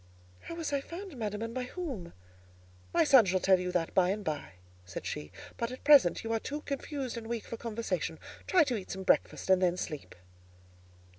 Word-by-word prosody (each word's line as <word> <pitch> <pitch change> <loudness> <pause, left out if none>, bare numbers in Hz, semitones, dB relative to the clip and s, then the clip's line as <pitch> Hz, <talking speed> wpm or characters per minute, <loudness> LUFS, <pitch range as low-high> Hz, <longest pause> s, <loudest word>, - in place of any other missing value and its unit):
"How 335 - -8
was 325 -3 -3
I 280 - +1
found, 350 +3 -8
madam, 210 -2 -3
and 230 0 -4
by 255 0 -2
whom?" 250 - -5 0.8
"My - - +4
son 270 -7 +7
shall 185 0 +2
tell 190 0 +4
you 180 0 -2
that 165 -2 0
by 185 -1 +4
and 205 +2 -1
by," 150 -10 -3 0.3
said 90 -1 -7
she; 75 0 -5 0.3
"but 235 +1 -2
at 255 - -9
present 280 - +6
you 225 0 -2
are 225 - +1
too 295 +6 -5
confused 275 -3 -4
and 225 -1 -6
weak 230 -1 -3
for - - -5
conversation: 230 0 -3 0.3
try 360 -3 +6
to 255 -5 -1
eat 195 -4 -6
some 190 0 -4
breakfast, - - +2
and 190 0 +5
then 180 -1 +2
sleep." 150 -5 -5
225 Hz, 205 wpm, -31 LUFS, 185-275 Hz, 0.8 s, son